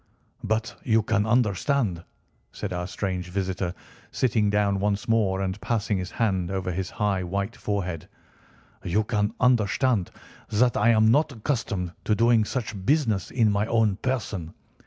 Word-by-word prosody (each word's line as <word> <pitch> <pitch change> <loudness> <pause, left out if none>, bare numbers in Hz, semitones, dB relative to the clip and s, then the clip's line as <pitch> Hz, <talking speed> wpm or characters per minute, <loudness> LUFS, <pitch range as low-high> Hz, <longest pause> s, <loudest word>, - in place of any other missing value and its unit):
"But 110 +1 -1
you 110 -1 +3
can 105 0 +1
understand," 110 - +1 0.5
said - - -5
our 90 0 -3
strange 90 -2 -3
visitor, 95 -1 -2 0.3
sitting 110 -5 +1
down 100 -1 +1
once 100 0 -1
more 105 -4 +2
and 95 +1 -3
passing 105 -4 0
his 90 0 -4
hand 95 -6 0
over 95 -1 -2
his 95 +2 -3
high 100 -3 0
white 100 +5 -3
forehead, 90 - -3 0.7
"you 105 +5 +1
can 105 0 -1
understand 120 -3 +2 0.4
that 120 +3 +2
I 115 - +3
am 110 -1 +5
not 150 +4 +3
accustomed 110 - -2
to 110 - +2
doing 115 -1 +4
such 110 -5 -4
business 110 - +1
in 115 -4 +2
my 100 +1 0
own 110 -4 +2
person. 105 -10 -3
105 Hz, 150 wpm, -25 LUFS, 95-115 Hz, 0.7 s, am